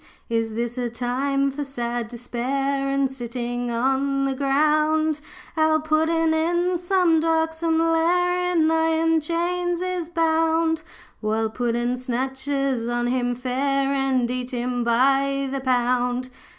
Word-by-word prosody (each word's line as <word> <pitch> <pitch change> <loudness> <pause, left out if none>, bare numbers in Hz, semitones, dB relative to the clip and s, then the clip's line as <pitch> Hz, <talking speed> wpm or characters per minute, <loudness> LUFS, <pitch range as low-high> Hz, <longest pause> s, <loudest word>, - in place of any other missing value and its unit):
Is 225 -1 -1
this 240 +2 -3
a 245 -1 -1
time 270 +4 -1
for 290 +2 -4
sad 240 -4 -3
despair 270 +4 -2
And 275 0 +1
sitting 245 -1 -4
on 270 +3 0
the 270 - 0
ground? 305 +3 +2 0.3
'Our 315 0 +3
Puddin' 320 +1 +1
in 345 +2 +1
some 355 -2 +3
darksome 320 0 +1
lair 355 +2 +2
In 320 -2 +3
iron 325 0 +2
chains 350 +2 -1
is 365 -3 -3
bound, 325 -1 +1 0.4
While 220 0 -1
puddin' 240 +1 -1
snatchers 265 0 -2
on 240 0 -1
him 245 0 0
fare, 275 +2 0
And 265 -3 +1
eat 250 0 -3
him 245 -1 -2
by 275 +3 +2
the 275 - -2
pound. 250 0 0
275 Hz, 125 wpm, -23 LUFS, 245-320 Hz, 0.4 s, Our